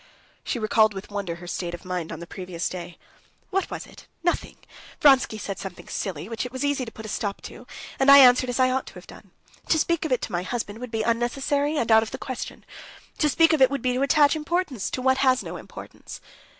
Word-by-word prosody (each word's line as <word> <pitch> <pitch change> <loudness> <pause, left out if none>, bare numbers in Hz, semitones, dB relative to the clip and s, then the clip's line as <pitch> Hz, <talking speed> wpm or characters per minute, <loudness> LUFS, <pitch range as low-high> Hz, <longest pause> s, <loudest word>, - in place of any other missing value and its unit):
She - - -2
recalled 215 -1 +3
with 195 +2 -8
wonder 200 -5 -3
her 175 +1 -11
state 175 0 -4
of 175 - -14
mind 180 -3 -4
on 165 - -6
the 170 - -7
previous 180 -1 -5
day. 175 -1 -8 0.5
"What 385 0 0
was - - -6
it? - - -16 0.2
Nothing. 345 - -1 0.4
Vronsky 270 -6 +5
said 200 -2 -5
something 195 -2 -8
silly, 185 -4 -4
which 225 -1 -4
it 250 - -6
was 260 +2 -3
easy 285 -3 0
to 225 - -9
put 220 - -10
a - - -6
stop 205 -1 -3
to, - - -11 0.3
and 270 +1 +4
I 280 - +11
answered 255 -1 +7
as 245 - -2
I 255 0 +4
ought 265 +1 -1
to - - -10
have - - -11
done. - - -14 0.4
To 320 - +4
speak 335 +1 +1
of 315 - -3
it 250 - +1
to - - -4
my 175 -1 -1
husband 210 +2 -4
would 250 0 -6
be 220 -1 -2
unnecessary 270 +6 0
and 230 -4 0
out 220 0 +7
of 220 - -4
the - - -6
question. 260 -2 -7 0.5
To 300 - +3
speak 325 +2 +4
of 310 - +1
it 260 - +7
would 280 -3 -3
be 250 -1 +1
to 255 - -1
attach 290 +1 +4
importance 310 - -2
to 255 - -4
what 260 0 +3
has 260 -1 +3
no - - -7
importance." - - -10
245 Hz, 240 wpm, -25 LUFS, 200-275 Hz, 0.5 s, I